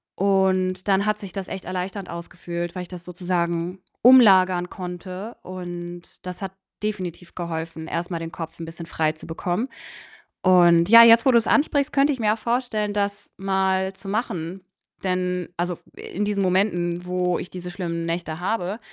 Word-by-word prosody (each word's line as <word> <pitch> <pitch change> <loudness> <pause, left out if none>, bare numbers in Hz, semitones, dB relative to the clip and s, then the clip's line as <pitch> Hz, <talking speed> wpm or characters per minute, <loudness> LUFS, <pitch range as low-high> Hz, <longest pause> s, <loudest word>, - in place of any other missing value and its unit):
und 190 -1 +1
dann 195 0 +3
hat 210 0 +1
sich 195 -4 -9
das 195 -2 -5
echt 190 - -6
erleichternd 185 +1 -4
angefühlt, 170 0 -5
weil 180 - -3
ich - - -10
das 175 -1 -9
sozusagen 175 0 -2 0.2
umlagern 190 -8 +7
konnte, 185 +4 -7
und 175 -1 -7 0.2
das 180 +1 -7
hat 190 -1 -5 0.3
definitiv 185 -5 -4
geholfen, 165 -2 -5
erst 170 +3 -3
mal 170 - -2
den 165 0 -6
Kopf 165 -1 -7
'n 165 - -5
bisschen 165 +1 -8
frei 155 -2 0
zu 155 - -13
bekommen 175 +8 -2 0.8
und 175 -2 +6
ja, 230 +1 +11
jetzt 230 0 +7
wo 265 - +6
du's 235 -2 +4
ansprichst, 285 -1 +2
könnte 280 +1 +3
ich 260 - -7
mir 215 -2 +3
auch - - -4
vorstellen, 230 -3 -1
das 200 0 -2
mal 190 0 +1
zu 195 - -13
machen. 195 -4 -3 0.4
Denn 180 -1 -1
also, 175 +1 -1
f - - -24
in 205 +3 -4
diesen 205 -1 0
Momenten, 180 -2 +1
wo 180 -1 0
ich 180 - -7
diese 180 -1 -7
schlimmen 175 -2 -3
Nächte 165 -1 -3
habe 190 +2 -2
185 Hz, 175 wpm, -24 LUFS, 175-200 Hz, 0.8 s, ja